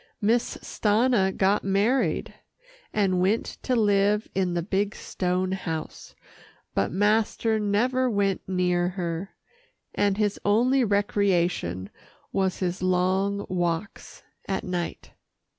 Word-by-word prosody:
Miss 230 +3 +1
Stanna 215 -2 +2
got 195 +2 +1
married, 205 +7 +1 0.6
and 190 -3 +1
went 200 +5 0
to 255 - 0
live 210 -1 +2
in 185 -2 0
the 170 - 0
big 200 +2 -1
stone 185 0 -2
house, 165 -5 -5 0.6
but 100 - +1
master 215 +2 +1
never 250 +5 +1
went 200 -3 0
near 180 -1 +1
her, 175 0 -4 0.6
and 205 -1 +1
his 210 -2 0
only 245 +6 +3
recreation 180 - 0 0.4
was 190 -1 0
his 185 0 -2
long 185 +2 +1
walks 175 +1 -3 0.2
at 195 - -2
night. 180 -2 -4
195 Hz, 110 wpm, -26 LUFS, 180-210 Hz, 0.6 s, only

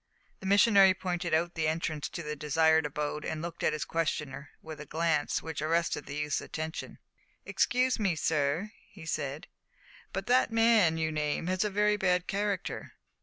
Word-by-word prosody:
The 190 - -6
missionary 200 -1 +6
pointed 180 -2 -3
out 170 +2 +1
the 160 -2 -1
entrance 155 -2 -2
to 170 - -6
the 150 0 -4
desired 160 +1 +3
abode, 150 +1 -3
and 160 - -3
looked 170 +1 -6
at - - +2
his 155 - -3
questioner 150 -3 -3
with 155 -2 -9
a - - -8
glance 160 -1 0
which 160 -2 -5
arrested 165 -1 0
the 140 - -6
youth's 150 0 -1
attention. 160 0 -6 0.5
"Excuse 255 0 +1
me, 195 -5 +1
sir," 155 +6 0 0.2
he 180 -5 -12
said, 150 -2 -3 0.7
"but 195 +1 -4
the 250 +2 +4
man 225 -7 +4
you 160 -1 0
name 150 +1 -1
has 185 +2 0
a 210 - 0
very 210 +1 +2
bad 180 -2 +1
character." 200 -1 -3
165 Hz, 170 wpm, -30 LUFS, 150-190 Hz, 0.7 s, missionary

